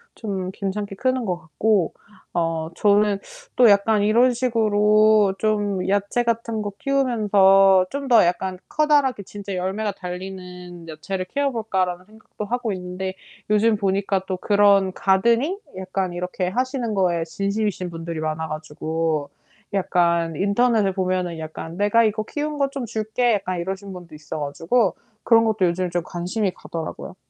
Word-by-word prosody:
좀 190 Hz, -4 st, -4 dB
괜찮게 200 Hz, +1 st, -4 dB
크는 255 Hz, +2 st, 0 dB
것 180 Hz, -3 st, -1 dB
같고. 175 Hz, +3 st, 0 dB, 0.4 s
어 165 Hz, -2 st, -1 dB
저는 205 Hz, +1 st, +3 dB, 0.4 s
또 245 Hz, -3 st, +6 dB
약간 205 Hz, +1 st, +4 dB
이런 235 Hz, +5 st, +4 dB
식으로 215 Hz, -3 st, +3 dB
좀 205 Hz, -3 st, 0 dB
야채 200 Hz, +4 st, +1 dB
같은 230 Hz, -1 st, -1 dB
거 205 Hz, -, -4 dB
키우면서 200 Hz, -8 st, +4 dB
'좀 280 Hz, +1 st, -4 dB
더 235 Hz, -7 st, +6 dB
약간 185 Hz, +1 st, -1 dB
커다랗게 290 Hz, -6 st, +2 dB
진짜 200 Hz, 0 st, -8 dB
열매가 195 Hz, +4 st, -2 dB
달리는 180 Hz, -2 st, -8 dB
야채를 185 Hz, +4 st, -5 dB
키워볼까.'라는 195 Hz, -8 st, -1 dB
생각도 215 Hz, 0 st, -9 dB
하고 240 Hz, +1 st, -2 dB
있는데 185 Hz, +1 st, -5 dB, 0.4 s
요즘 215 Hz, +1 st, +4 dB
보니까 195 Hz, -1 st, 0 dB
또 185 Hz, -, -2 dB
그런 200 Hz, -1 st, +3 dB
가드닝 235 Hz, -, +2 dB, 0.2 s
약간 185 Hz, -1 st, -3 dB
이렇게 180 Hz, +1 st, -3 dB
하시는 250 Hz, +2 st, -2 dB
거에 175 Hz, -3 st, +1 dB
진심이신 200 Hz, +2 st, -2 dB
분들이 165 Hz, -1 st, -5 dB
많아 155 Hz, +1 st, -2 dB
가지고 155 Hz, 0 st, -3 dB, 0.4 s
약간 170 Hz, -3 st, +1 dB
인터넷에 205 Hz, +3 st, +2 dB
보면은 185 Hz, -2 st, -1 dB
약간 160 Hz, +1 st, -7 dB
"내가 205 Hz, +3 st, +3 dB
이거 215 Hz, -1 st, 0 dB
키운 295 Hz, +5 st, -4 dB
거 280 Hz, -1 st, +2 dB
좀 275 Hz, -2 st, -5 dB
줄게." 225 Hz, +2 st, 0 dB
약간 185 Hz, -3 st, -3 dB
이러신 190 Hz, +2 st, -5 dB
분도 175 Hz, -3 st, -11 dB
있어 150 Hz, 0 st, -7 dB
가지고 165 Hz, +9 st, 0 dB, 0.3 s
그런 225 Hz, -1 st, +5 dB
것도 215 Hz, -4 st, +2 dB
요즘 180 Hz, +1 st, -1 dB
좀 175 Hz, 0 st, 0 dB
관심이 180 Hz, +5 st, -2 dB
가더라고요. 165 Hz, -1 st, -7 dB
195 Hz, 315 characters per minute, -22 LUFS, 180-220 Hz, 0.4 s, 또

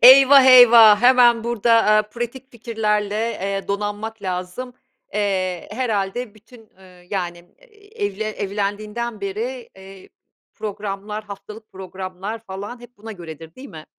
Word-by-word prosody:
Eyvah, 270 Hz, +2 st, +9 dB
eyvah 230 Hz, -4 st, +8 dB
hemen 245 Hz, -2 st, +5 dB
burada, 235 Hz, -1 st, 0 dB
aaa, 215 Hz, 0 st, +4 dB
pratik 240 Hz, +5 st, -7 dB
fikirlerle, 210 Hz, -3 st, -2 dB
eee, 200 Hz, -3 st, -3 dB
donanmak 205 Hz, +2 st, -4 dB
lazım. 185 Hz, +7 st, -5 dB, 0.4 s
Eee, 185 Hz, -4 st, -2 dB
herhâlde 220 Hz, -1 st, -3 dB
bütün, 220 Hz, +1 st, -19 dB
ııı, 180 Hz, -2 st, -18 dB
yani, 175 Hz, -3 st, -3 dB, 0.2 s
eee, 430 Hz, -, -9 dB
evle 205 Hz, +2 st, -5 dB
evlendiğinden 210 Hz, +3 st, -4 dB
beri, 230 Hz, +6 st, -5 dB
eee, 190 Hz, 0 st, -14 dB, 0.5 s
programlar, 210 Hz, 0 st, -6 dB
haftalık 210 Hz, +2 st, -11 dB
programlar 190 Hz, +2 st, -7 dB
falan 205 Hz, +3 st, -9 dB
hep 240 Hz, 0 st, -16 dB
buna 220 Hz, +2 st, -9 dB
göredir, 165 Hz, -3 st, -11 dB
değil 270 Hz, +1 st, -11 dB
mi? 155 Hz, -1 st, -11 dB
210 Hz, 125 wpm, -21 LUFS, 195-235 Hz, 0.5 s, Eyvah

